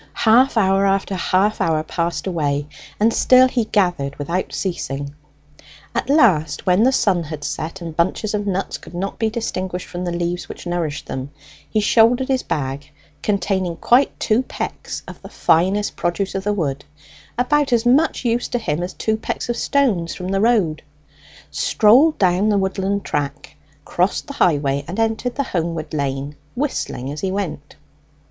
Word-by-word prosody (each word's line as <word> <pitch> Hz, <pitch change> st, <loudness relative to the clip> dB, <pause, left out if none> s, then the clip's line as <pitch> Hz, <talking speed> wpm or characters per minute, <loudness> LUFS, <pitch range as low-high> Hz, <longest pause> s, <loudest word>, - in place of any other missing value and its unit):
Half 240 Hz, +3 st, +5 dB
hour 195 Hz, -1 st, +3 dB
after 195 Hz, 0 st, 0 dB
half 190 Hz, +3 st, +1 dB
hour 155 Hz, -1 st, +1 dB
passed 170 Hz, -2 st, -2 dB
away, 145 Hz, -6 st, -1 dB, 0.3 s
and 225 Hz, +2 st, +3 dB
still 255 Hz, 0 st, +6 dB
he 245 Hz, -3 st, 0 dB
gathered 175 Hz, -10 st, 0 dB
without 170 Hz, +6 st, -3 dB
ceasing. 140 Hz, -6 st, -3 dB, 0.8 s
At 235 Hz, +2 st, -2 dB
last, 165 Hz, -, +3 dB
when 180 Hz, +2 st, +4 dB
the 255 Hz, +3 st, +5 dB
sun 185 Hz, -9 st, +1 dB
had 150 Hz, -1 st, -7 dB
set, 165 Hz, +6 st, -4 dB
and 165 Hz, -2 st, -6 dB
bunches 185 Hz, +5 st, 0 dB
of 205 Hz, -1 st, -2 dB
nuts 195 Hz, 0 st, -2 dB
could -, -, -12 dB
not 195 Hz, +3 st, -4 dB
be 225 Hz, -1 st, +1 dB
distinguished 185 Hz, -5 st, -4 dB
from 175 Hz, 0 st, -5 dB
the 175 Hz, -, -2 dB
leaves 175 Hz, +1 st, -3 dB
which -, -, -9 dB
nourished 175 Hz, -4 st, -2 dB
them, 130 Hz, +1 st, -5 dB, 0.4 s
he 215 Hz, -, +1 dB
shouldered 240 Hz, +5 st, +4 dB
his 260 Hz, -1 st, +2 dB
bag, 140 Hz, 0 st, -3 dB, 0.3 s
containing 195 Hz, -4 st, 0 dB
quite 245 Hz, +10 st, +2 dB
two 220 Hz, +3 st, +2 dB
pecks 260 Hz, -, -5 dB
of -, -, -10 dB
the -, -, -10 dB
finest 190 Hz, +5 st, +1 dB
produce 180 Hz, +3 st, -1 dB
of 195 Hz, 0 st, -4 dB
the 210 Hz, -, +1 dB
wood, 140 Hz, -8 st, -2 dB, 0.5 s
about 280 Hz, +3 st, +2 dB
as 235 Hz, -1 st, +2 dB
much 275 Hz, +2 st, +3 dB
use 235 Hz, +1 st, +1 dB
to -, -, -1 dB
him 170 Hz, -9 st, -2 dB
as 180 Hz, +1 st, -4 dB
two 220 Hz, -, 0 dB
pecks 220 Hz, -, -4 dB
of 240 Hz, -, 0 dB
stones 230 Hz, -, +1 dB
from 180 Hz, 0 st, -5 dB
the 195 Hz, 0 st, +1 dB
road, 205 Hz, -9 st, +2 dB, 0.7 s
strolled 255 Hz, +9 st, +4 dB
down 185 Hz, +2 st, +2 dB
the 205 Hz, -, +3 dB
woodland 195 Hz, +1 st, -1 dB
track, 145 Hz, -1 st, -3 dB, 0.3 s
crossed 180 Hz, +3 st, 0 dB
the 280 Hz, -, -7 dB
highway 145 Hz, -, +1 dB
and 185 Hz, +6 st, -5 dB
entered 225 Hz, +2 st, 0 dB
the 280 Hz, -, 0 dB
homeward 165 Hz, -, -3 dB
lane, 140 Hz, 0 st, -2 dB, 0.2 s
whistling 240 Hz, -, -3 dB
as 150 Hz, +1 st, -6 dB
he 190 Hz, -, -1 dB
went. 180 Hz, -7 st, -4 dB
190 Hz, 170 wpm, -20 LUFS, 160-225 Hz, 0.8 s, still